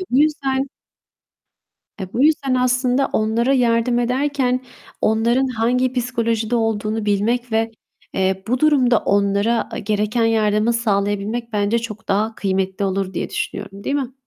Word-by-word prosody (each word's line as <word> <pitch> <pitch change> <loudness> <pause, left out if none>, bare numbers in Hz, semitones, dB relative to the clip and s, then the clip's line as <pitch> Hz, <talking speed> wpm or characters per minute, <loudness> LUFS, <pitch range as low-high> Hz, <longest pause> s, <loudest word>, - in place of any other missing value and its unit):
Ve - - -3
bu 255 - +3
yüzden 275 -3 +1 1.3
Eee, 190 -2 -7
bu 255 - +2
yüzden 290 -4 +2
aslında 255 +1 +1
onlara 230 +4 +1
yardım 240 -1 +2
ederken 255 +1 0 0.4
onların 235 +4 +2
hangi 250 +1 0
psikolojide 230 -2 -1
olduğunu 220 -1 -1
bilmek 230 +4 0
ve, 225 0 +1 0.4
eee, 190 0 0
bu 250 +2 0
durumda 260 -6 +4
onlara 200 +3 +1
gereken 215 +3 0
yardımı 215 0 +2
sağlayabilmek 215 +1 -1
bence 210 +3 +1
çok 220 -1 -8
daha 215 +3 0
kıymetli 190 0 -1
olur 190 0 -2
diye - - -3
düşünüyorum, 200 0 -5
değil 280 - -1
mi? 265 -3 -3
230 Hz, 135 wpm, -20 LUFS, 205-250 Hz, 1.3 s, durumda